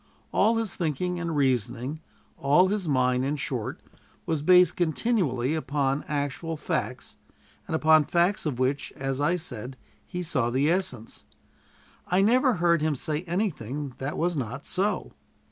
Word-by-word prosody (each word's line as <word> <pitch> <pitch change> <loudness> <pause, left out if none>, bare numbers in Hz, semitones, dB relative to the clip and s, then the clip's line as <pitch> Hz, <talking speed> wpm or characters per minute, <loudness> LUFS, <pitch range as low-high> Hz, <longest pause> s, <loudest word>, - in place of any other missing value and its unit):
All 225 +1 +3
his 225 -5 -1
thinking 175 +2 -2
and 170 -2 -3
reasoning, 130 +2 0 0.3
all 150 +7 +4
his 200 -3 -1
mind, 125 -2 +2
in 140 +3 0
short, 130 0 -4 0.5
was 160 -4 -1
based 180 +1 +5
continually 160 - 0
upon 145 -2 -1
actual 150 +2 -3
facts, - - -3 0.5
and 160 - -1
upon 155 -1 +5
facts 175 +2 +1
of 135 -5 -2
which, 130 +2 -1
as 135 0 -3
I 150 +5 +2
said, 130 -7 -6 0.3
he 180 -1 -4
saw 130 -8 0
the 135 +6 +2
essence. 130 - -3 0.8
I 185 +2 +3
never 250 +3 +4
heard 170 -2 +2
him 155 -1 +1
say 150 +3 -2
anything 150 - -3
that 135 +3 -3
was 175 +1 0
not 135 0 -4
so. 200 +3 -1
150 Hz, 145 wpm, -26 LUFS, 135-175 Hz, 0.8 s, based